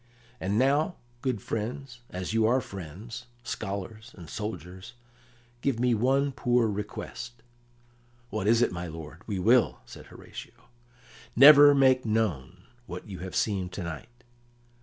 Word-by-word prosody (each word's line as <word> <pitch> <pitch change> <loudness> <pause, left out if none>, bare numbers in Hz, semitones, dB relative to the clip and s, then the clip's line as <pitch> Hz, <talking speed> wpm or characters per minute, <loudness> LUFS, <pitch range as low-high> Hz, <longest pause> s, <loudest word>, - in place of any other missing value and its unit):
And 100 +3 -1
now, 145 +7 +2 0.3
good 125 -7 -2
friends, 120 +3 -4
as 90 +3 -4
you 110 -1 +3
are 125 +3 +3
friends, 105 - -8 0.2
scholars, 110 +3 -6
and 85 -3 -10
soldiers, 95 0 -6 0.7
give 130 -3 0
me 125 0 +3
one 135 +5 +2
poor 125 -3 +2
request." 110 +3 -6 0.9
"What 105 -2 -2
is 115 +2 +5
it, - - +1
my 90 0 -5
lord? 80 +1 -9
We 100 -3 -2
will," 115 +6 +3
said - - -12
Horatio. - - -12 0.7
"Never 145 +2 +9
make 130 -2 +4
known 95 - -1 0.2
what 90 +3 -7
you 95 -3 -8
have 90 +1 -7
seen 95 -4 0
to 90 0 -6
night." 100 +10 -8
110 Hz, 140 wpm, -28 LUFS, 95-125 Hz, 0.9 s, Never